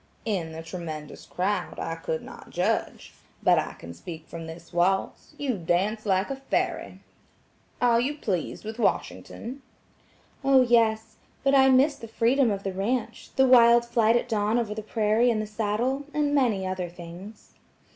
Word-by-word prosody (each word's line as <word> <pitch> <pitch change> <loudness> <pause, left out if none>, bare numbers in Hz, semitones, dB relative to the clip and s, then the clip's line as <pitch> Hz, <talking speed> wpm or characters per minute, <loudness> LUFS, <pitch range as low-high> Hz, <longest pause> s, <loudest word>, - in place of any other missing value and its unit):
"In 185 -7 -2
the 160 0 -7
tremendous 160 -3 -7
crowd, 185 0 -2
I 165 - -3
could 160 -1 -4
not - - -12
judge. - - -2 0.3
But - - +5
I - - -4
can 85 0 -10
speak 160 - -9
from 165 -1 -8
this 165 +2 -11
waltz–you 195 +7 -1
dance 195 +6 0
like 190 +4 +1
a 270 - -3
fairy. 270 - -2 0.8
Are 240 -1 +4
you 285 +4 -1
pleased 190 - -3
with 220 +2 -6
Washington?" 250 +2 -2 0.8
"Oh, 270 -1 +6
yes; 225 -2 +2 0.3
but 275 0 +3
I 265 -1 +6
miss 275 +3 +4
the 230 - -9
freedom 235 +3 +2
of 200 -1 -2
the 195 - -3
ranch, 230 +4 -2
the 265 - +5
wild 235 -2 +6
flight 230 -1 +3
at 240 - +1
dawn 215 0 +1
over 225 -3 -1
the 215 - -5
prairie 215 +2 +2
in 225 -2 +1
the 215 - -2
saddle, 225 +6 -1
and 295 -1 +1
many 235 -9 +2
other 185 -1 -3
things." 175 +5 -11
215 Hz, 165 wpm, -26 LUFS, 185-245 Hz, 0.8 s, Oh